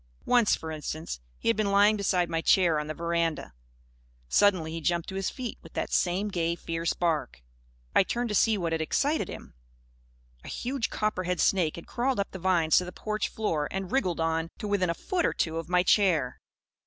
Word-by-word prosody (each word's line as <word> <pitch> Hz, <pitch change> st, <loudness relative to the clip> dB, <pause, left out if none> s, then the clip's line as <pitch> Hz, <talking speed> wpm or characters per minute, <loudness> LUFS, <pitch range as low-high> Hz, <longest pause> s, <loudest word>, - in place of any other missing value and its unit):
Once, 240 Hz, -4 st, +4 dB
for 160 Hz, -, -7 dB
instance, 155 Hz, -, -5 dB, 0.2 s
he -, -, -6 dB
had 230 Hz, -, +4 dB
been 215 Hz, -2 st, 0 dB
lying 205 Hz, +2 st, +5 dB
beside 185 Hz, -4 st, +1 dB
my 165 Hz, -1 st, -1 dB
chair 170 Hz, -3 st, +4 dB
on 150 Hz, -, -4 dB
the 155 Hz, -, -3 dB
veranda. 170 Hz, -, -1 dB, 0.7 s
Suddenly 175 Hz, -, +3 dB
he 165 Hz, 0 st, -5 dB
jumped 170 Hz, +1 st, 0 dB
to -, -, -6 dB
his 195 Hz, 0 st, -1 dB
feet, 250 Hz, -4 st, -6 dB
with -, -, -15 dB
that -, -, -3 dB
same 190 Hz, +4 st, +1 dB
gay, 170 Hz, -3 st, -1 dB
fierce 165 Hz, -1 st, -2 dB
bark. 155 Hz, -, -1 dB, 0.5 s
I -, -, +6 dB
turned 240 Hz, +5 st, -1 dB
to -, -, -2 dB
see 215 Hz, +2 st, +3 dB
what 170 Hz, -3 st, -2 dB
had 160 Hz, 0 st, 0 dB
excited 285 Hz, -, 0 dB
him. -, -, -9 dB, 0.9 s
A -, -, -11 dB
huge 255 Hz, -1 st, -2 dB
copperhead 185 Hz, -4 st, -1 dB
snake 175 Hz, -5 st, +2 dB
had 170 Hz, -, -9 dB
crawled 255 Hz, -1 st, -1 dB
up 200 Hz, -, -1 dB
the 190 Hz, -, -7 dB
vines 170 Hz, -3 st, +3 dB
to 180 Hz, -, -4 dB
the 180 Hz, -, -7 dB
porch 215 Hz, +3 st, -2 dB
floor 160 Hz, -9 st, -1 dB
and 195 Hz, 0 st, -3 dB
had 185 Hz, -, -12 dB
wriggled 185 Hz, -11 st, 0 dB
on; 165 Hz, 0 st, 0 dB
to 210 Hz, -, -5 dB
within 200 Hz, -3 st, +1 dB
a 170 Hz, -, 0 dB
foot 360 Hz, -, -2 dB
or -, -, +1 dB
two 165 Hz, 0 st, -1 dB
of 165 Hz, -, -7 dB
my 180 Hz, 0 st, +3 dB
chair. 170 Hz, -, +2 dB
180 Hz, 210 wpm, -28 LUFS, 165-205 Hz, 0.9 s, I